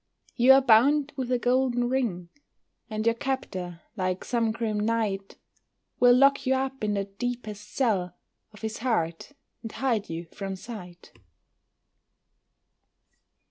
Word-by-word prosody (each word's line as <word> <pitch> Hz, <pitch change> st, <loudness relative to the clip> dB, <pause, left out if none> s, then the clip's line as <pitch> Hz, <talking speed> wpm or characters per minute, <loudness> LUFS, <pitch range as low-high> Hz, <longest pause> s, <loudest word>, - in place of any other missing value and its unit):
You 255 Hz, +2 st, +7 dB
are 270 Hz, 0 st, +5 dB
bound 275 Hz, +5 st, +4 dB
with 255 Hz, -2 st, -3 dB
a 250 Hz, -, +3 dB
golden 245 Hz, 0 st, +1 dB
ring, 225 Hz, -10 st, -1 dB, 0.6 s
And 215 Hz, -1 st, -3 dB
your 230 Hz, -, +4 dB
captor, 190 Hz, -10 st, -4 dB
like 185 Hz, -2 st, -2 dB
some 230 Hz, -2 st, +1 dB
grim 220 Hz, -2 st, -2 dB
knight, 210 Hz, -3 st, -1 dB, 0.6 s
Will 245 Hz, 0 st, +7 dB
lock 275 Hz, 0 st, +4 dB
you 265 Hz, -, +3 dB
up 265 Hz, -1 st, -3 dB
in 210 Hz, -1 st, 0 dB
the 200 Hz, -1 st, -1 dB
deepest 210 Hz, 0 st, -5 dB
cell 190 Hz, -9 st, 0 dB, 0.4 s
Of 210 Hz, -, -16 dB
his 220 Hz, 0 st, -4 dB
heart, 220 Hz, -, -1 dB, 0.3 s
and 225 Hz, -, -7 dB
hide 230 Hz, -6 st, -1 dB
you 165 Hz, +1 st, -5 dB
from 195 Hz, +3 st, -6 dB
sight. 185 Hz, -4 st, -10 dB
225 Hz, 135 wpm, -27 LUFS, 195-255 Hz, 0.6 s, You